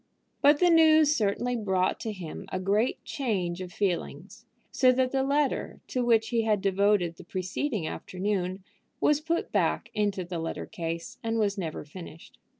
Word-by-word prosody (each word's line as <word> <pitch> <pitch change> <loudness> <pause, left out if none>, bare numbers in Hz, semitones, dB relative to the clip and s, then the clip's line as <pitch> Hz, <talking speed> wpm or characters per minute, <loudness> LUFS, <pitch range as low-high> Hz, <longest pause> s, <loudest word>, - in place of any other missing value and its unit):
But 290 +1 +6
the 355 -1 +5
news 315 -2 +6
certainly 230 +4 0
brought 190 -5 0
to 225 - -3
him 180 -6 -7
a 185 - -2
great 205 +6 +1
change 185 -10 -2
of 180 -1 -7
feelings, 185 -2 -3 0.2
so 255 -1 +5
that 255 0 +1
the 270 - +1
letter 280 +1 0
to 255 - 0
which 225 -2 +3
he 235 -2 +2
had 215 -2 +1
devoted 195 -3 +2
the - - -11
preceding 185 - -3
afternoon 185 +1 -3 0.4
was 295 0 +3
put 335 +2 -2
back - - 0
into 205 -3 -1
the 175 -1 -4
letter 165 0 -4
case, 170 -5 -5
and 225 0 -1
was 205 -2 +1
never 165 -7 -5
finished. 165 +1 -12
205 Hz, 165 wpm, -28 LUFS, 185-255 Hz, 0.4 s, But